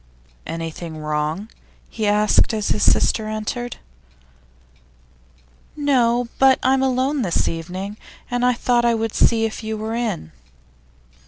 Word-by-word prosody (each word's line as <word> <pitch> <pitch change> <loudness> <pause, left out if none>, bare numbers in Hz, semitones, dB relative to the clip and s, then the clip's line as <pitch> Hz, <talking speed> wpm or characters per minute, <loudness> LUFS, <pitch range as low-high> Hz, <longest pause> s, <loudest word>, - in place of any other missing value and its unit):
'Anything 165 0 -6
wrong?' 155 +5 -2 0.4
he 220 -2 -3
asked, 210 +2 +3
as 215 -1 -1
his 210 - 0
sister 220 -1 +3
entered. 215 +3 -4 2.0
'No; 245 -5 +2
but 265 -1 +6
I'm 265 +1 +3
alone 265 +2 +1
this 180 -7 0
evening, 185 +5 -5 0.3
and 245 0 0
I 250 0 +4
thought 240 0 +1
I 235 -1 +3
would 225 -1 -2
see 225 -1 +3
if 220 +1 -5
you 220 0 -3
were 220 +1 -4
in. 225 - -3
220 Hz, 130 wpm, -21 LUFS, 195-245 Hz, 2.0 s, but